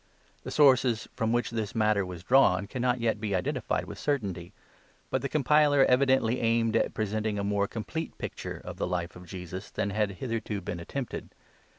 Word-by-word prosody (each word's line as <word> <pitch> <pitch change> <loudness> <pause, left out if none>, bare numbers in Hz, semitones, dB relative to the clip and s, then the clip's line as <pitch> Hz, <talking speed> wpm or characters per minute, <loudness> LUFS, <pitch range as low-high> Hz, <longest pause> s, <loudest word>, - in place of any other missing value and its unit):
/The - - -6
sources 130 -5 +4
from 110 0 0
which 120 -1 0
this 110 -2 -3
matter 105 -2 +3
was 90 -2 -7
drawn 100 -6 +4
cannot 125 +3 -1
yet 110 -2 0
be 105 -3 -1
identified 90 - -1
with - - -9
certainty; 100 - -2 0.6
but - - +1
the - - -2
compiler 150 -1 +4
evidently 130 -2 +3
aimed 115 -1 +2
at - - +1
presenting 110 0 -1
a 100 - -1
more 100 0 +1
complete 160 +10 -5
pic - - -4
ture - - -6
of - - -7
the - - -1
Life 90 -1 -3
of 90 0 -12
Jesus 90 +1 -7
than 100 - -2
had 105 -1 0
hitherto 115 -2 -3
been 90 -1 -5
attempted. 125 +9 -5
110 Hz, 185 wpm, -28 LUFS, 100-125 Hz, 0.6 s, sources